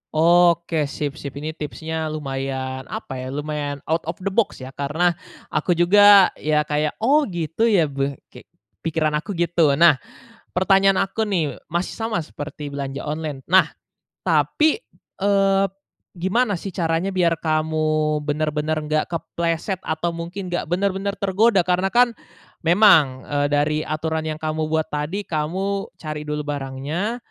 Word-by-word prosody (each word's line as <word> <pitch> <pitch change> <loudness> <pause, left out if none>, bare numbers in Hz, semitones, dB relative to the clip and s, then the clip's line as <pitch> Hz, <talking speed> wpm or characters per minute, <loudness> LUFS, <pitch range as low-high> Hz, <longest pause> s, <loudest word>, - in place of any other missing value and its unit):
Oke 170 -1 +3
sip 145 +1 -4
sip, 140 -1 -7
ini 150 +2 -4
tipsnya 160 +1 -4
lumayan, 135 -3 -4
apa 130 - -6
ya, 130 - -5
lumayan 145 0 -4
out 160 0 -1
of 165 - -2
the 195 - -1
box 200 - 0
ya, 130 - -8
karena 150 +6 0 0.4
aku 155 +3 +1
juga, 200 +2 +7
ya 150 0 +1
kayak, 150 0 -1
"Oh 290 +5 +4
gitu 175 +4 -1
ya," 200 -7 +4
gue 140 0 -2 0.2
kek, - - -14 0.3
pikiran 155 -2 0
aku 195 +5 -6
gitu. 170 -4 +2
Nah 160 -3 +5 0.6
pertanyaan 195 +1 +4
aku 220 +2 -2
nih, 170 -8 -1
masih 175 +3 -2
sama 225 -7 -2
seperti 145 -1 -7
belanja 140 -1 -5
online. 150 -3 -4
Nah 185 +2 +4 0.5
tapi, 315 +9 +2 0.3
eee, 195 -1 +3 0.5
gimana 195 +2 0
sih 195 - -5
caranya 165 +1 0
biar 175 -4 +1
kamu 155 -1 0
bener-bener 150 +1 -1
nggak 155 0 +1
kepleset 170 +2 -2
atau 160 +2 -2
mungkin 175 +3 -6
nggak 175 - -2
bener-bener 195 +2 -1
tergoda 200 0 +3
karena 180 +2 +1
kan, 240 +3 +4 0.5
memang, 160 -7 +5
eee, 145 0 0
dari 145 +1 +1
aturan 160 +1 -2
yang 155 - -3
kamu 155 0 -2
buat 160 0 -1
tadi, 150 +8 -2
kamu 190 +5 -2
cari 155 -1 -5
dulu 150 0 -2
barangnya, 145 - -3
160 Hz, 145 wpm, -22 LUFS, 150-185 Hz, 0.6 s, juga